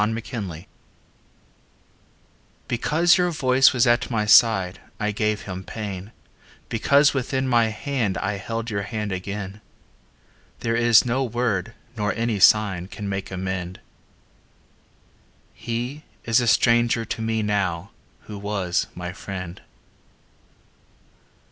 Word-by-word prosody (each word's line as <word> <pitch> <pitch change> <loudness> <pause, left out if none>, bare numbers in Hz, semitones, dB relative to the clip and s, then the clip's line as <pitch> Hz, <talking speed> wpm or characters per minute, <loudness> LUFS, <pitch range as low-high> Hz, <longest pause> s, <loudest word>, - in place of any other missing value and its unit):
XVII 105 - -4 2.0
Because 165 +9 +3
your 180 0 +2
voice 135 -4 +4
was 125 -4 +2
at 120 0 +2
my 110 -3 0
side 100 -4 +4 0.2
I 105 0 0
gave 105 0 -1
him 95 -1 -6
pain, 100 0 -6 0.6
Because 140 +6 +3
within 130 0 -1
my 120 -3 +3
hand 110 -2 -2
I 105 0 -2
held 115 +4 -4
Your 100 -1 -1
hand 105 0 -4
again. 100 +2 -5 1.0
There 115 0 0
is 120 0 +5
no 125 +2 0
word 115 -3 -2 0.2
nor 105 -2 -1
any 115 -3 -1
sign 95 -3 +4
Can 100 0 -6
make 95 0 -4
amend 95 -1 -4 1.7
He 120 +5 -4 0.2
is 115 +2 +3
a 120 - -1
stranger 115 0 +3
to 110 - -4
me 110 -1 -1
now 100 -4 -1 0.3
Who 105 -2 -9
was 100 -3 -1
my 90 0 -6
friend. 90 -2 -7
110 Hz, 115 wpm, -23 LUFS, 95-120 Hz, 2.0 s, is